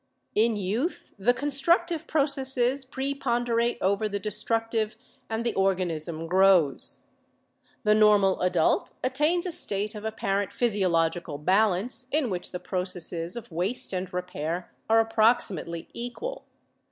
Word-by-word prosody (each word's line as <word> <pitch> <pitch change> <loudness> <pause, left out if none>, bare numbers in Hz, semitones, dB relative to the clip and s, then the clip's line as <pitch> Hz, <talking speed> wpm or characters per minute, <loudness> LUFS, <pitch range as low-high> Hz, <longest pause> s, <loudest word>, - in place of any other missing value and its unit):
In 225 +1 +2
youth 210 - -3
the 205 +6 +4
constructive 320 +5 +1
processes 270 -3 +1
preponderate 240 -3 -1
over 200 +3 +1
the 200 - -2
destructive 220 +1 -1 0.3
and 225 +1 -2
the 235 - 0
organism 170 -4 0
grows. 180 -5 +4 0.8
The 210 - +4
normal 210 -3 +4
adult 180 -3 +1
attains 300 +7 +1
a 360 - -2
state 210 -8 +2
of 210 -1 -8
apparent 200 -3 -2
physiological 175 -8 0
balance 200 - +1
in 290 -7 0
which 180 -1 -4
the 180 - -6
processes 180 -2 -3
of 235 -5 -8
waste 185 +8 -1
and 185 0 -3
repair 180 -1 -4 0.2
are 225 0 +5
approximately 215 -7 +1
equal. 345 - -6
210 Hz, 120 wpm, -26 LUFS, 180-245 Hz, 0.8 s, are